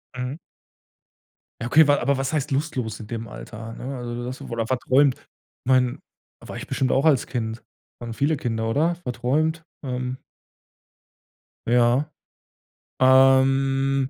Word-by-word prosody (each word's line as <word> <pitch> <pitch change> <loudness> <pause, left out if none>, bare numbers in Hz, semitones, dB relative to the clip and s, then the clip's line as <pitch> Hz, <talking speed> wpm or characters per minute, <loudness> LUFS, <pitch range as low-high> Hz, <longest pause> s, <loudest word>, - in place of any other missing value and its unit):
Mhm. 125 +3 -4 1.2
Ja, 120 - -2
okay, 150 +4 +6
wa 145 - +5
aber 140 +2 +1
was 135 +2 -2
heißt 145 -1 -1
lustlos 135 -6 -2
in 105 - -9
dem 115 0 -5
Alter? 110 +2 -9
Ne, 130 +3 -6
also 120 -1 -5
du 120 0 -5
warst 130 +1 -7
wohl 115 -1 -2
verträumt. 130 +2 +3
Ich - - -24 0.4
mein, 125 -1 +2 0.4
war - - -9
ich - - -7
bestimmt 130 -1 0
auch 135 +3 +2
als 145 -6 +4
Kind. 115 -2 -4 0.4
Waren 115 -1 -6
viele 145 +5 +1
Kinder, 115 -3 -2
oder? 160 +8 +1
Verträumt. 155 +3 -1 0.2
Ähm. 125 -1 -3 1.5
Ja. 120 +5 +3 0.9
Ähm, 135 +1 +4
130 Hz, 140 wpm, -24 LUFS, 120-135 Hz, 1.5 s, okay